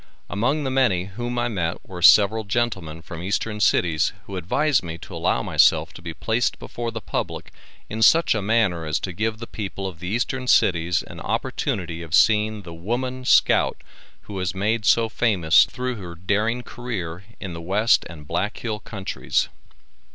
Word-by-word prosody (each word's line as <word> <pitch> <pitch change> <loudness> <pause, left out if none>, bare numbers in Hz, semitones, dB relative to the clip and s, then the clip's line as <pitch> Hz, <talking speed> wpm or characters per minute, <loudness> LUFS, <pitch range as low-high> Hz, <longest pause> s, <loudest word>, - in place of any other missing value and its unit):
Among 130 +11 0
the 135 - -2
many 125 -10 +2
whom 120 +5 -5
I 120 0 +1
met 90 -7 -3
were 90 -2 -8
several 105 +4 +6
gentlemen 100 -8 -2
from 85 -2 -8
eastern 105 +3 -2
cities 85 -6 +2
who 100 - -7
advised 120 - +1
me 85 -2 -6
to - - -11
allow - - 0
myself - - +3
to - - -11
be 85 -1 -6
placed 115 +9 -1
before 120 -1 -5
the 115 0 -5
public - - -4 0.4
in 110 +1 -5
such 165 +9 +5
a 110 - -1
manner 100 -6 +1
as 75 +1 0
to 95 - -4
give 110 +4 -1
the 115 - -7
people 100 -3 -6
of 90 -4 -6
the 90 - -6
eastern 125 +5 -2
cities 90 -5 +3
an - - -11
opportunity 85 -3 -2
of 85 +1 -1
seeing 105 +3 +3
the 85 -1 -9
Woman 125 +9 -3
Scout - - +3 0.4
who 105 - -11
was 95 -1 -2
made 105 +3 0
so 115 +5 +4
famous 95 -9 +4
through 125 -1 -4
her 90 -4 -8
daring 105 +7 0
career 95 -10 -5 0.2
in 95 -3 -6
the 85 - -7
West 105 +7 +3
and 75 -4 -11
Black 105 +7 -2
Hill 110 -3 -4
countries. 100 -2 -2
100 Hz, 180 wpm, -23 LUFS, 90-115 Hz, 0.4 s, several